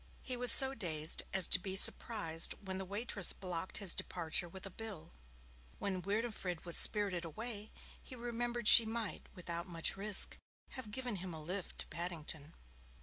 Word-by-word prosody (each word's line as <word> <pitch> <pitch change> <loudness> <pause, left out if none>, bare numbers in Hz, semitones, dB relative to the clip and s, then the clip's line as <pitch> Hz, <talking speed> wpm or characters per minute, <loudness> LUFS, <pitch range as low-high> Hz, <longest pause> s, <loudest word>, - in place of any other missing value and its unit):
He 255 - -3
was 245 -1 +8
so 265 +2 +7
dazed 160 - 0
as 190 -2 +1
to - - +6
be 190 +1 -6
surprised 165 -5 +3
when 190 -1 -8
the 190 - -7
waitress 200 -1 -1
blocked 180 -1 -6
his 195 -5 +1
departure 170 0 -1
with 190 +3 -10
a 195 - -9
bill. 215 -5 -9 0.7
When 190 -2 -5
Winifred 200 -3 -5
was 170 - +1
spirited 200 -5 +1
away, 215 +5 -8 0.3
he 255 - -12
remembered 240 -1 -5
she 235 - +10
might, 225 -2 -7
without 170 0 -5
much 165 0 -1
risk, 200 +1 +3 0.3
have 260 -5 -8
given 245 -1 -5
him 180 -2 -8
a 155 - -8
lift 185 +3 -5
to - - -1
Paddington. 160 -3 -8
190 Hz, 165 wpm, -33 LUFS, 170-225 Hz, 0.7 s, she